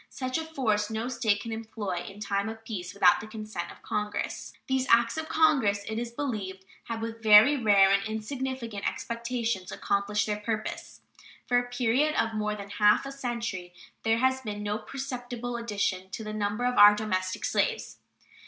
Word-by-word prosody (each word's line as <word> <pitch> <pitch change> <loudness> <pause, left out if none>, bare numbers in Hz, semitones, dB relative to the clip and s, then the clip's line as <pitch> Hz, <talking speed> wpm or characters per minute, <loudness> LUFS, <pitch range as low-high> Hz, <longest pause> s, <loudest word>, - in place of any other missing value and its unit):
Such 255 +3 -3
a - - -3
force 225 -10 0
no 220 +2 -3
State 215 -5 +1
can 230 - -6
employ 220 -5 -4
in 200 +1 -12
time 200 0 -1
of 225 0 -9
peace 185 -5 -5
without 190 -3 +5
the 215 - -8
consent 215 0 -6
of - - -16
Congress. 210 0 -3
These 265 0 0
acts 230 0 +4
of 315 0 -4
Congress, 265 -11 +3
it 220 0 -2
is 240 0 -3
believed, 210 -8 -4 0.2
have, 225 -1 -4
with 225 0 -5
very 220 +6 +8
rare 205 -6 +5
and 200 0 +4
insignificant 230 -1 -4
exceptions, 235 -5 -3
accomplished 200 +1 0
their 210 -1 -2
purpose. 215 0 -4 0.4
For 245 0 +3
a 245 0 -5
period 250 +5 +1
of 225 0 +1
more 210 -1 -1
than 200 -1 -9
half 210 +4 +4
a 275 - -5
century 235 -9 -4 0.3
there 225 0 +2
has 260 +2 +2
been 210 -3 -5
no 210 +1 -2
perceptible 245 -3 -5
addition 200 -5 -2
to 220 - -6
the 215 0 -5
number 210 +2 -1
of 250 0 +1
our 205 0 +10
domestic 185 -3 -2
slaves. 465 -2 -1
220 Hz, 180 wpm, -28 LUFS, 205-245 Hz, 0.4 s, our